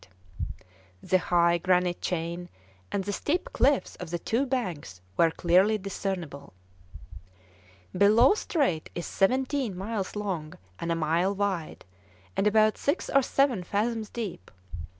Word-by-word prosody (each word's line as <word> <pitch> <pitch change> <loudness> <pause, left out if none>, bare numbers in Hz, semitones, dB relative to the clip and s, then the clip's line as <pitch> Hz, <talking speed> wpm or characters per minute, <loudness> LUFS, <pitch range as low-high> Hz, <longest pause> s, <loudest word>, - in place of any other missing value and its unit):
The 185 - +3
high 170 -1 +3
granite 180 0 +1
chain 175 0 -3 0.4
and 195 - -1
the 205 +1 -3
steep 315 - -2
cliffs 275 +1 +2
of 180 - -7
the 175 - -2
two 235 +10 -1
banks 180 - -3 0.2
were 165 - +4
clearly 185 +6 +3
discernible. 185 - -5 1.4
Bellot 215 - +5
Strait 260 - 0
is 175 - -4
seventeen 255 0 0
miles 195 0 -3
long 185 -7 -3 0.2
and 170 - -2
a - - +2
mile 165 +5 +1
wide, 190 -5 -2 0.5
and 200 - +2
about 215 0 +3
six 285 +5 -1
or 275 - +5
seven 265 -5 +1
fathoms 215 +3 -1
deep. 210 - -6
195 Hz, 130 wpm, -27 LUFS, 175-225 Hz, 1.4 s, Bellot